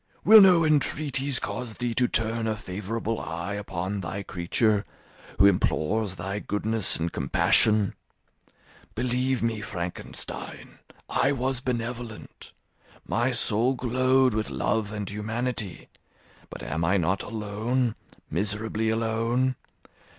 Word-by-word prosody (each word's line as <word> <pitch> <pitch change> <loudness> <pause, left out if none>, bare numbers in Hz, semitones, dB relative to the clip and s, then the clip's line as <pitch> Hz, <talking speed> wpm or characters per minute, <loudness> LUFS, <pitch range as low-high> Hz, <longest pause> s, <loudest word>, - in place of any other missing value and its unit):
Will 220 +1 +10
no 180 -4 +6
entreaties 140 -3 +2
cause 120 -2 -4
thee 120 -1 -2
to 125 +1 +3
turn 115 0 +1
a 110 - 0
favourable 105 +3 -4
eye 85 +4 -4
upon 100 -1 -4
thy 95 +2 -5
creature, 100 +4 +1 0.5
who 100 - +6
implores 100 +1 +1
thy 95 +3 -4
goodness 105 0 0
and 85 +1 -2
compassion? 105 +9 +3 1.0
Believe 125 +1 0
me, 115 -2 -1
Frankenstein, 90 -4 -6 0.3
I 135 - +1
was 130 -1 -1
benevolent; 120 -3 -5 0.6
my 120 +2 +1
soul 120 +1 +1
glowed 130 +1 +2
with 110 0 -1
love 105 -1 -1
and 105 -2 -4
humanity; 110 -1 -3 0.6
but - - -9
am 80 - -2
I 90 +5 +3
not 95 +2 0
alone, 110 +3 -2 0.4
miserably 105 +4 0
alone? 115 +3 0
110 Hz, 115 wpm, -26 LUFS, 100-125 Hz, 1.0 s, Will